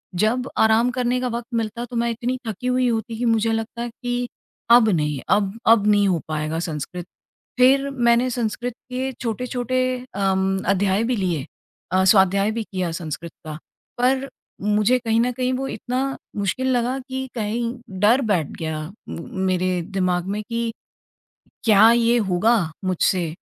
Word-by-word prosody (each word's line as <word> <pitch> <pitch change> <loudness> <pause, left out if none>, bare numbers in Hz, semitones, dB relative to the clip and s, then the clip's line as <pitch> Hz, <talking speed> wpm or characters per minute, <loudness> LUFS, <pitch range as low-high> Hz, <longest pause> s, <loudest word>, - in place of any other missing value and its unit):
जब 235 +7 +1
आराम 220 +2 +4
करने 250 0 0
का 255 - 0
वक़्त 235 -1 -4
मिलता 230 +1 -2
तो 245 - -9
मैं 235 0 +1
इतनी 240 +3 -2
थकी 220 +3 -4
हुई 250 0 +2
होती 225 -1 -2
कि 245 - -1
मुझे 225 -1 +2
लगता 225 +1 -3
है 240 - -3
कि 245 0 -1 0.4
अब 235 -2 +7
नहीं, 150 -6 0
अब 200 -2 +2
अब 225 -2 +5
नहीं 205 -1 +4
हो 180 -3 +1
पाएगा 155 +1 -2
संस्कृत। 165 +1 -5 0.5
फिर 270 +2 +4
मैंने 240 -1 +2
संस्कृत 240 0 -2 0.2
के 260 +1 -2
छोटे-छोटे 250 +1 -1 0.3
अम, 195 -1 +1
अध्याय 195 +2 +2
भी 245 +2 0
लिए 175 - -1 0.5
अ, 185 0 +3
स्वाध्याय 195 +1 +4
भी 225 0 -3
किया 185 -4 -3
संस्कृत 165 0 -5
का। 155 -1 -5 0.4
पर 260 +2 +1 0.3
मुझे 210 +4 +3
कहीं 225 -2 +1
न 250 +1 +1
कहीं 255 +1 -1
वो 265 +1 -2
इतना 260 +3 -3 0.2
मुश्किल 205 +6 -1
लगा 245 +2 0
कि 265 0 -3
कहीं 225 +1 -2 0.4
डर 225 +7 +4
बैठ 165 -7 +1
गया 160 -1 -3 0.3
म - - -5 0.2
मेरे 185 -1 +1
दिमाग 180 -2 0
में 210 - -2
कि 230 0 -1 0.9
क्या 220 0 +7
ये 235 0 +3
होगा 205 +7 +3 0.3
मुझसे? 185 -1 +1
225 Hz, 160 wpm, -22 LUFS, 190-245 Hz, 0.9 s, अब